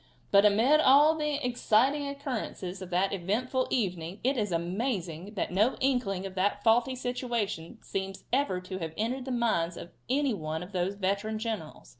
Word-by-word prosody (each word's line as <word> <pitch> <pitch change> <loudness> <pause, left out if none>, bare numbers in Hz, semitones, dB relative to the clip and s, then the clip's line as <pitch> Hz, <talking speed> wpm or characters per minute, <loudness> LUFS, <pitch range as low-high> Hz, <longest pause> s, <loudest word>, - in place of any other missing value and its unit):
But 200 +1 +6
amid 235 +9 +4
all 295 +2 +6
the 300 -2 -1
exciting 250 +4 +2
occurrences 250 - -5
of 185 - -7
that 185 +2 +1
eventful 230 +8 -1
evening 180 -5 -2
it 265 +3 +2
is 210 -5 -1
amazing 180 +1 -2
that 190 - -2
no 210 +8 +3
inkling 245 -8 0
of 190 - -6
that 205 +2 0
faulty 240 +3 +3
situation 240 -9 -3
seems 195 0 -4
ever 260 -9 +1
to 185 +1 -6
have 160 -2 -5
entered 250 +4 -2
the 265 - -4
mind 200 -9 0
of 170 - -9 0.2
any 275 0 +2
one 160 -3 -4
of 180 - -11
those 185 +1 -1
veteran 200 +3 -1
generals. 215 -8 -5
210 Hz, 170 wpm, -29 LUFS, 185-255 Hz, 0.2 s, But